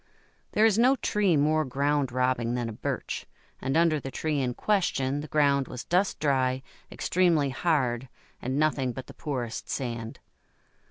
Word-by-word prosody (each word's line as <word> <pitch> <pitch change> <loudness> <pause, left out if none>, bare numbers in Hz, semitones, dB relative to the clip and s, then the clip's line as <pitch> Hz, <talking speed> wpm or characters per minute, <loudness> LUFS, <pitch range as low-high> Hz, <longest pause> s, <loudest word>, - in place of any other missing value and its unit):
There 215 - +5
is 220 -1 +4
no 255 +3 +5
tree 205 - +1
more 155 +2 +3
ground 140 0 0
robbing 125 -1 0
than 120 -1 -2
a - - -6
Birch, - - -4 0.3
and 135 +3 0
under 165 -2 +3
the 135 - -6
tree 150 +2 -1
in 125 -2 -1
question 145 -9 0
the 150 - -7
ground 140 -2 +2
was 125 - -6
dust 185 +3 +1
dry, 130 -3 +1 0.3
extremely 170 -6 +2
hard, 130 -5 0 0.3
and 130 +2 -2
nothing 145 -4 +1
but 130 - -7
the - - -12
poorest 125 -6 -4
sand. 115 -3 -4
140 Hz, 160 wpm, -27 LUFS, 130-155 Hz, 0.3 s, There